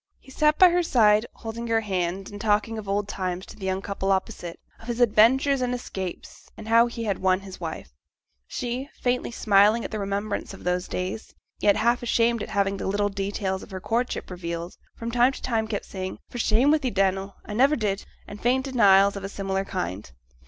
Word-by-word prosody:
He 265 - -17
sat 300 +2 +2
by 370 - +8
her 355 +1 +3
side, 220 -7 +4
holding 230 +1 -6
her 225 -1 +2
hand, 190 -2 -2
and 205 0 -8
talking 215 +1 +1
of 205 -2 -8
old 200 +1 0
times 185 -2 -3
to - - -12
the 190 -3 -6
young 190 +1 -1
couple 195 -1 -2
opposite; 180 -2 -2 0.2
of 225 - -14
his 240 0 -3
adventures 250 +4 +4
and 250 0 0
escapes, 190 -7 -7
and 220 - -9
how 230 +1 +5
he 235 -1 -5
had 200 -4 -1
won 185 0 +2
his 190 -1 -10
wife. 165 -2 -6 0.6
She, 250 +3 -4
faintly 250 0 0
smiling 215 0 +3
at - - -5
the 215 - -3
remembrance 200 0 -3
of - - -14
those 180 +1 -1
days, 185 +4 -5 0.2
yet 205 - +4
half 235 +3 +2
ashamed 235 -1 +2
at - - -5
having 200 -1 0
the - - -4
little 205 +1 +1
details 195 -1 -2
of - - -12
her 190 -2 -6
courtship 235 +1 -2
revealed, 170 -1 -5 0.2
from 230 0 -4
time 245 +2 +4
to - - -9
time 225 -3 0
kept 210 -2 -3
saying, 185 -1 -5
'For 245 - -6
shame 235 +6 +3
wi' 310 - +4
thee, 265 -3 -1
Dannel 195 -1 0
I 210 - -6
never 270 +7 +4
did,' 205 -5 -2 0.2
and 205 +1 -9
faint 260 +3 +2
denials 200 -6 +5
of 200 - -6
a 195 - -4
similar 195 -1 -2
kind. 90 - -4
210 Hz, 210 wpm, -25 LUFS, 195-235 Hz, 0.6 s, by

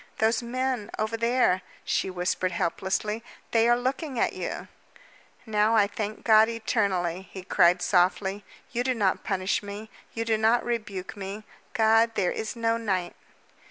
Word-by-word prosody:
"Those 220 +1 +2
men 250 -2 -2
over 220 +1 -1
there," 230 -5 +2 0.2
she - - 0
whispered 180 0 -1
helplessly. 190 +6 -1 0.3
"They 230 0 +4
are 240 - +5
looking 260 +2 -2
at - - +1
you!" - - -5 0.8
"Now, 215 0 +2
I 210 -2 +5
thank 210 +1 -5
God 220 0 +6
eternally," 195 -6 -1
he 190 - -8
cried 180 -1 +3
softly, 190 +2 +1 0.3
"You 245 0 -1
do 255 0 0
not 200 -4 +1
punish 190 -1 0
me, 205 +2 -8 0.2
you 230 0 -2
do 220 -1 +1
not 225 +2 +3
rebuke 215 -6 -4
me. 200 +1 -6 0.3
God, 225 0 +4
there 180 -3 +1
is 220 +2 -4
no 230 0 +1
night!" 190 -6 -2
215 Hz, 155 wpm, -27 LUFS, 190-230 Hz, 0.8 s, God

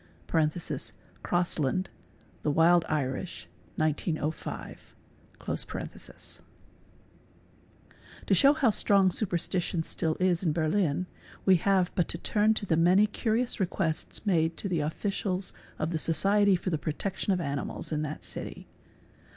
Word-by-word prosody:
(Crossland, 175 0 0 0.5
'The - - 0
Wild 165 +3 +4
Irish," 135 - -3 0.3
1905.) 155 0 -3 0.4
380 - - -4
SUPERSTITION - - -10 1.8
To - - +2
show 280 +1 +6
how 275 -7 +3
strong 195 -2 +4
superstition 175 -3 -1
still 160 -1 -1
is 180 -2 +2
in 165 -5 +1
Berlin 165 +1 +1 0.4
we 190 -2 +6
have. 185 0 +2
but 175 - +1
to - - 0
turn 215 +4 +2
to 205 - -2
the 170 - +2
many 180 +5 +5
curious 225 +3 -1
requests 175 0 -2
made 165 -4 +2
to - - -3
the 175 -4 0
officials 185 +4 -2 0.2
of 155 +2 -2
the 160 - -1
Society 200 +5 +4
for 180 +1 -3
the 155 - 0
Protection 190 +6 -2
of 185 - +1
Animals 140 -1 -3
in 155 -1 0
that 155 0 -5
city. - - -6
175 Hz, 125 wpm, -29 LUFS, 160-195 Hz, 1.8 s, show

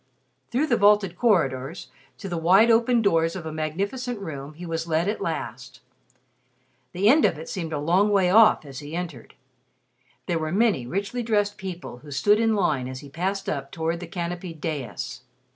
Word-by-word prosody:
Through 260 +6 +1
the 240 -6 +2
vaulted 205 -3 +4
corridors, 165 - 0 0.3
to 200 - -7
the 175 -3 -3
wide 190 +8 +5
opened 230 +1 +3
doors 165 -4 +2
of 175 -4 -6
a 160 - -4
magnificent 200 - -3
room 150 -5 -7
he 175 +3 -8
was 165 0 -3
led 165 +2 +1
at 210 - -2
last. 130 -6 -5 1.1
The 190 +3 +1
end 290 +7 +6
of - - +3
it 160 - -8
seemed 165 -4 -4
a 155 - -2
long 175 +8 +2
way 190 -3 +3
off 215 -6 +6
as 135 -2 -8
he 150 +2 -7
entered. 170 -9 -6 0.9
There 170 -2 -1
were 155 0 -3
many 195 - +2
richly 200 - -2
dressed 205 -3 0
people 180 -10 -7
who 145 - -14
stood 205 +10 +3
in 225 -1 +2
line 140 -10 0
as 130 0 -7
he 145 - -11
passed 190 +6 -3
up 140 -2 -3
toward 165 +1 -2
the 175 - -7
canopied 175 -1 -5
dais. 145 -5 -5
175 Hz, 185 wpm, -25 LUFS, 155-205 Hz, 1.1 s, end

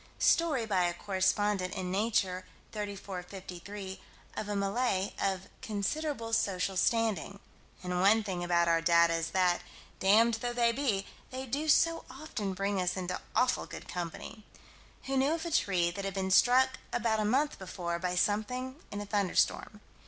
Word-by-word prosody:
Story, 305 -8 +3
by 190 -4 +2
a 175 0 -1
correspondent, 190 0 0
in 185 -1 -3
Nature, 190 -3 +1 0.3
34 200 -3 -5
53, 190 +1 -8 0.3
of 210 - -4
a 205 - -1
Malay, 200 0 0
of 190 -2 0 0.2
"considerable 230 +3 -2
social 190 -3 +1
standing" 205 -2 +1 0.4
and 180 0 -1
one 215 +3 +5
thing 185 -4 -3
about 170 -1 +2
our 165 0 +3
data 170 0 +5
is 165 0 -1
that, 180 0 +2 0.4
damned 225 +4 +4
though 245 0 -2
they 235 -1 +3
be, 230 -7 0 0.2
they 260 +1 -5
do 280 +5 -2
so 330 +2 +4
often 240 -9 -5
bring 195 0 0
us 180 +1 -1
into 180 0 -3
awful 250 0 +2
good - - -9
company 180 +5 -6 0.6
who 270 - -2
knew 275 +4 +3
of 330 0 -3
a 340 - -3
tree 180 - +2
that 200 +3 -6
had 195 -1 -3
been 190 -1 -1
struck, 255 +5 +5
about 220 -2 +1
a - - +1
month 270 +8 +1
before, 175 -2 -4
by 180 0 -1
something 250 +8 0
in 205 - -5
a - - -5
thunderstorm. 205 +1 0
200 Hz, 165 wpm, -31 LUFS, 185-230 Hz, 0.6 s, one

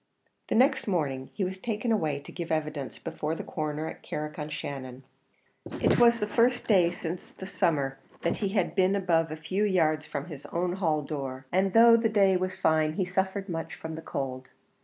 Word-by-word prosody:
The - - 0
next 260 +3 +3
morning 140 -9 -1
he 205 - -2
was 190 +1 -3
taken 225 +2 -2
away 155 -10 +1
to - - -11
give 170 -1 -5
evidence 155 -3 -2
before 155 +2 -3
the - - -5
Coroner 155 0 -3
at - - -8
Carrick 150 0 -5
on 150 0 -4
Shannon. 135 -3 -6 0.8
It - - +3
was 235 -1 +6
the 210 - 0
first 240 +3 +2
day 185 -6 +5
since 175 0 -6
the 190 - -10
summer 145 -8 0 0.2
that 170 - +1
he 200 - -1
had 195 -3 0
been 190 0 +3
above 170 -4 +2
a - - -3
few 185 +6 -2
yards 155 -6 +2
from 140 0 -4
his 150 -5 -9
own 175 +1 -1
hall 160 -5 0
door, 135 -3 -5
and 190 +1 +2
though 230 0 +8
the 225 -1 +1
day 200 -3 +4
was 185 +1 -1
fine, 160 -4 +2
he 185 +3 0
suffered 190 +2 -1
much 165 -3 -4
from 160 0 -7
the 160 - -6
cold. 130 -4 -4
170 Hz, 200 wpm, -28 LUFS, 150-195 Hz, 0.8 s, though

